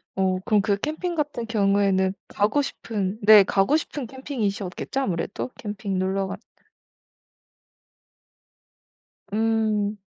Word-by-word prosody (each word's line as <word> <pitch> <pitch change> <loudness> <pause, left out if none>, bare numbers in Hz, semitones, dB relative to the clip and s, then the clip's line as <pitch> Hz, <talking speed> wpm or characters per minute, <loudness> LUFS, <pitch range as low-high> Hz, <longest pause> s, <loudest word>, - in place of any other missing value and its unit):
어 190 -1 +1
그럼 210 -2 +3
그 200 -1 +1
캠핑 315 - -3
같은 295 -6 -2
경우에는 195 -3 +2
가고 215 +8 +1
싶은 215 -6 -3
네 210 -1 +9
가고 195 +10 +2
싶은 285 -5 -5
캠핑이셨겠죠 235 -2 -3
아무래도? 190 +3 -2
캠핑 205 -3 -3
놀러 190 +1 0
가 195 +1 -5 3.0
음. 215 -2 +1
210 Hz, 220 characters per minute, -24 LUFS, 195-235 Hz, 3.0 s, 네